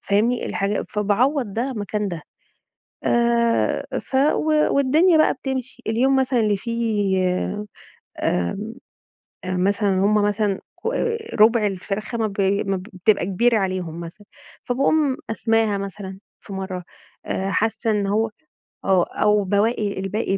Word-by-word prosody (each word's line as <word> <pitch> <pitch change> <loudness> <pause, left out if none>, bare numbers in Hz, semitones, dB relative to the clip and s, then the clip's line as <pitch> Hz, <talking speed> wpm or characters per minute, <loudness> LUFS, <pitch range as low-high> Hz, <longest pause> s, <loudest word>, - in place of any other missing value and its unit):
فاهمني. 225 +5 +1
الحاجة 200 +1 -1
فباعوّض 215 +3 +1
ده 255 +4 -1
مكان 210 0 -2
ده. 165 -4 -6 0.8
آآ 235 -1 +2
ف - - -14
و 305 +2 +2
والدنيا 315 +6 +4
بقى 310 - +4
بتمشي. 265 -1 -5
اليوم 255 +5 +2
مثلًا 260 -2 +2
اللي 210 -2 +2
فيه 215 -3 0 1.0
آمم 195 - -1 0.7
أ 185 0 -2
مثلًا 200 +2 +1
هم 200 +3 +2
مثلًا 205 -1 0 0.2
كو 465 - -3 0.4
رُبع 220 0 +5
الفرخة 205 +4 -3
ما 220 - +1
ب 200 -1 -4 0.3
ما 195 -1 0
بتبقى 185 0 0
كبيرة 225 +4 +2
عليهم 185 -4 -3
مثلًا، 175 +5 -10 0.4
فباقوم 275 +2 +2
قسماها 225 -2 +1
مثلًا 195 -1 -6 0.2
في 200 - -11
مرّة 190 -2 -5 0.4
أ 195 +1 -2
حاسّة 220 +4 0
إن 205 -2 +1
هو 220 +2 +1 0.6
آه. 190 -3 +4
أو 210 -1 +3
بواقي 205 +1 0
الباقي 195 0 -1
210 Hz, 130 wpm, -22 LUFS, 195-235 Hz, 1.0 s, رُبع